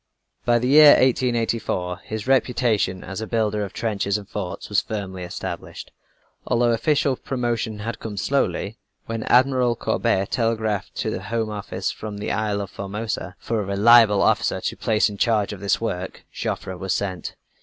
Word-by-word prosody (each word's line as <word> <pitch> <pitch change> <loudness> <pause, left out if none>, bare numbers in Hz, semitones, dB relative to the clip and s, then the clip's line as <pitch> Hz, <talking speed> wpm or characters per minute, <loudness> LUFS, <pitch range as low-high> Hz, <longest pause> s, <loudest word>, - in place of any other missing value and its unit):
By 120 0 +4
the 120 +1 0
year 150 +2 +9
1884, 115 -8 +1
his 110 -1 -5
reputation 120 -7 +1
as 95 +4 -6
a 110 - -4
builder 105 -2 0
of 100 - -5
trenches 100 -2 -1
and 100 -2 -10
forts 100 -4 -5
was - - +2
firmly 95 -4 -5
established, 90 0 -6 0.6
although 120 -1 +3
official 135 +3 +2
promotion 120 -4 -2
had 115 +2 -4
come 105 -2 -6
slowly. 115 -2 -1 0.3
When 115 0 -4
Admiral 125 -1 +3
Courbet 95 -3 0
telegraphed 110 -4 -1
to - - -2
the - - -4
Home 110 +2 -2
Office 105 -1 -3
from 105 -1 -7
the 105 - -3
Isle 105 -1 -1
of 100 -1 -6
Formosa 100 -1 -4
for 115 -2 -2
a - - -4
reliable 105 +1 +6
officer - - +2
to - - -3
place 110 -1 +2
in 100 -2 -7
charge 105 -3 +2
of 100 - -8
this 100 0 +1
work, 95 -5 -4
Joffre 95 - -4
was 95 +1 -2
sent. 95 -4 -4
110 Hz, 165 wpm, -23 LUFS, 100-120 Hz, 0.6 s, year